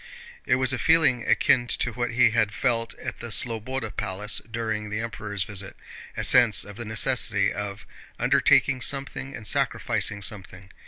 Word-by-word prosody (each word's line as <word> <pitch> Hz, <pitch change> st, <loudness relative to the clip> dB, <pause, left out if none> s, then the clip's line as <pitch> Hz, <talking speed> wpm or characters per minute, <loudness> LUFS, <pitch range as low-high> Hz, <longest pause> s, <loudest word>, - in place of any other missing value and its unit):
It -, -, +4 dB
was 130 Hz, 0 st, +1 dB
a 130 Hz, -, -2 dB
feeling 140 Hz, -4 st, +3 dB
akin 120 Hz, -2 st, +3 dB
to 115 Hz, -1 st, -1 dB
what 120 Hz, +1 st, -2 dB
he 120 Hz, -1 st, +4 dB
had 110 Hz, -2 st, 0 dB
felt 115 Hz, -2 st, -1 dB
at -, -, -7 dB
the 120 Hz, -, -7 dB
Slobóda 115 Hz, +1 st, -2 dB
Palace 105 Hz, +1 st, -1 dB
during 110 Hz, -2 st, -3 dB
the 105 Hz, +1 st, -3 dB
Emperor's 105 Hz, -4 st, -4 dB
visit—a 100 Hz, -1 st, -6 dB
sense 120 Hz, -4 st, +5 dB
of 105 Hz, -, -11 dB
the 120 Hz, +2 st, -7 dB
necessity 110 Hz, -2 st, +1 dB
of 100 Hz, -1 st, -6 dB, 0.3 s
undertaking 135 Hz, -2 st, +3 dB
something 135 Hz, 0 st, -4 dB
and 110 Hz, -, -10 dB
sacrificing 100 Hz, +1 st, 0 dB
something. 95 Hz, -1 st, -8 dB
115 Hz, 155 wpm, -25 LUFS, 105-125 Hz, 0.3 s, sense